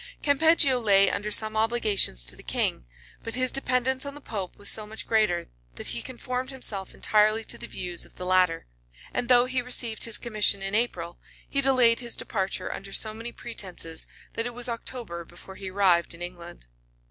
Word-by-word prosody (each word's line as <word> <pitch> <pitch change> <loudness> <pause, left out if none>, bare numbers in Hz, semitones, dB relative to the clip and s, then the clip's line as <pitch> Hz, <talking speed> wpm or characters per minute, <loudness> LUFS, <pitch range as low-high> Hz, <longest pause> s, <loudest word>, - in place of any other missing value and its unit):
Campeggio 285 -2 +4
lay 200 -3 +6
under 210 +1 -2
some 215 +1 0
obligations 215 - +2
to - - -4
the - - -12
king; - - -1 0.4
but 230 - -4
his 255 0 +1
dependence 260 -1 +1
on 280 0 -5
the - - -9
pope 200 -9 -6
was 205 - -4
so 215 -1 +2
much 220 +1 -5
greater, 215 -6 +1 0.3
that - - -7
he 120 - -2
conformed 255 +1 -5
himself 210 -8 -3
entirely 215 +1 +3
to - - 0
the - - -7
views 175 -1 -4
of - - -10
the 180 - -6
latter; 180 -2 +2 0.5
and 245 - -2
though 245 -1 +6
he 255 0 -1
received 240 -2 0
his 230 -2 +2
commission 215 -4 +1
in 195 +1 -3
April, 180 -7 -1 0.3
he 275 - +1
delayed 255 -4 +5
his 240 -2 -3
departure 190 -1 -3
under 195 0 -8
so 215 +2 0
many 230 +2 -7
pretences, 185 -10 -1 0.3
that 230 +1 -2
it 245 - -8
was 245 +1 -3
October 230 -7 -5
before 175 +3 -13
he 190 0 -7
arrived 185 -3 +2
in 170 - -12
England. 170 - -8
215 Hz, 190 wpm, -26 LUFS, 185-245 Hz, 0.5 s, lay